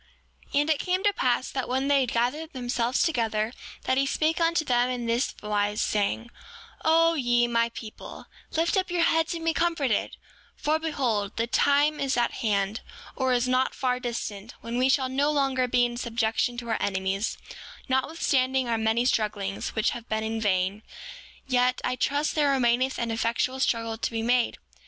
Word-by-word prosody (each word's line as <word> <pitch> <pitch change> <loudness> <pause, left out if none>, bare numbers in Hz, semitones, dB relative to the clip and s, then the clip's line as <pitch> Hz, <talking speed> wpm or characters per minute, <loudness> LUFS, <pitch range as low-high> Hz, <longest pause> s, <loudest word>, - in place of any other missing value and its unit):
7:18 280 - +2
And 295 - -2
it 305 - +1
came 370 +1 -1
to 410 -1 +3
pass 255 -6 0
that 265 -2 -3
when 265 +2 0
they 285 -1 +4
had 250 - -1
gathered 295 +8 -1
themselves 245 -1 0
together 225 -7 0 0.3
that 260 - +1
he 275 - +1
spake 320 +4 0
unto 330 -1 +2
them 245 -1 +2
in 245 -2 -3
this 235 +3 0
wise, 210 0 0
saying: 215 +3 -1 0.5
O 330 +1 +4
ye, 240 -5 +2
my 235 0 +1
people, 225 -2 -10 0.3
lift 330 +1 +1
up 375 -1 0
your 350 -1 +1
heads 325 +1 +2
and 330 -1 -6
be 330 - +2
comforted; 320 -10 0 0.4
for 310 +1 0
behold, 245 -10 -1
the 230 - +1
time 285 +5 +2
is 275 -1 0
at 240 - +2
hand, 210 -2 0 0.3
or 260 -1 0
is 250 0 +2
not 255 +1 +1
far 250 -2 0
distant, 230 -3 -5
when 235 +1 -3
we 260 +1 +3
shall 265 -1 +2
no 275 +3 +1
longer 270 -3 +1
be 245 0 +3
in 240 0 -4
subjection 235 0 -1
to 235 -1 -6
our 225 - -1
enemies, 190 +1 -1 0.5
notwithstanding 265 -1 +1
our 230 -1 0
many 220 +2 +1
strugglings, 205 -5 -1
which 220 - +2
have 240 -1 -8
been 220 0 -1
in 220 0 -3
vain; 195 0 0 0.6
yet 250 -1 +2
I 250 - 0
trust 285 +4 0
there 295 -2 +2
remaineth 255 -1 +2
an 235 -1 -2
effectual 235 +3 -1
struggle 230 -3 0
to - - -1
be 225 -1 -3
made. 245 0 +2
245 Hz, 185 wpm, -26 LUFS, 230-280 Hz, 0.6 s, they